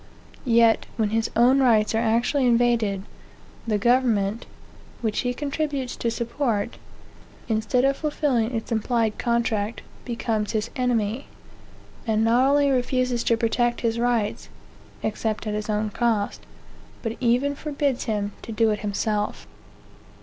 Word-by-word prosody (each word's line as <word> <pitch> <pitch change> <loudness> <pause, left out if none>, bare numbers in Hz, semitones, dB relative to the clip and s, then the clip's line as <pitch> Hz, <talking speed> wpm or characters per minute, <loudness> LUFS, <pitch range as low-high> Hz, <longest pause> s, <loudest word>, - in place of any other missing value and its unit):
Yet, 230 -1 +4
when 215 -2 +1
his 225 0 0
own 250 +4 +5
rights 225 -5 +3
are 220 - +2
actually 235 +4 +2
invaded, 230 -5 +2 0.6
the 215 -2 +2
government, 230 -2 +1 0.5
which 220 -3 -1
he 245 - 0
contributes 280 -1 -3
to 235 - -1
support, 235 -2 -2 0.7
instead 225 +3 +1
of 275 0 +2
fulfilling 265 -6 0
its 225 +1 -4
implied 225 -1 0
contract, 235 -2 0 0.2
becomes 225 -3 -2
his 220 +1 -1
enemy, 245 -1 0 0.8
and 220 0 +2
not 240 +4 +4
only 285 0 +3
refuses 255 -1 0
to 230 - +3
protect 240 +1 0
his 230 -1 0
rights, 235 -3 0 0.5
(except 220 0 -2
at 210 - -2
his 210 +1 -4
own 210 0 0
cost,) 220 -3 0 0.6
but 225 -1 -2
even 250 +3 +2
forbids 285 -3 -2
him 210 -3 -1
to - - -8
do 225 0 +2
it 210 - -1
himself. 210 0 -2
230 Hz, 135 wpm, -24 LUFS, 215-250 Hz, 0.8 s, own